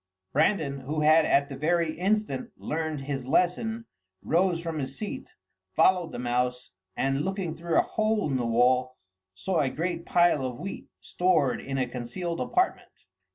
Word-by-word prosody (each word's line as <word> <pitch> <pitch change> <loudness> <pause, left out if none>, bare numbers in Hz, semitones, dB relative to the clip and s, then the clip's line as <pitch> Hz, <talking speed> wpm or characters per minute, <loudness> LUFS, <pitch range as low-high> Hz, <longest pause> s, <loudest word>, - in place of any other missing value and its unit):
Brandan, 155 -3 +1
who 150 +4 -3
had 155 +1 +5
at 140 0 +3
the 140 - -7
very 165 +3 +1
instant 215 +6 -1
learned 155 -2 -3
his 135 -2 -4
lesson, 220 - +1 0.4
rose 175 +1 +2
from 165 -2 -4
his 135 -1 -5
seat, 210 - -6 0.5
followed 180 -3 +3
the - - -6
mouse, 125 +1 -1 0.3
and 135 +1 +1
looking 190 -1 -2
through 165 +1 -1
a - - +5
hole 215 -3 0
in 135 - -1
the 125 - -1
wall, 125 +2 +2 0.4
saw 180 - -1
a 140 -3 +2
great 170 +3 -3
pile 175 -6 +3
of 125 -2 -3
wheat, 195 +2 -6
stored 175 -7 +1
in 135 0 -4
a 130 - +1
concealed 130 +8 -4
apartment. 365 0 0
155 Hz, 160 wpm, -27 LUFS, 135-180 Hz, 0.5 s, had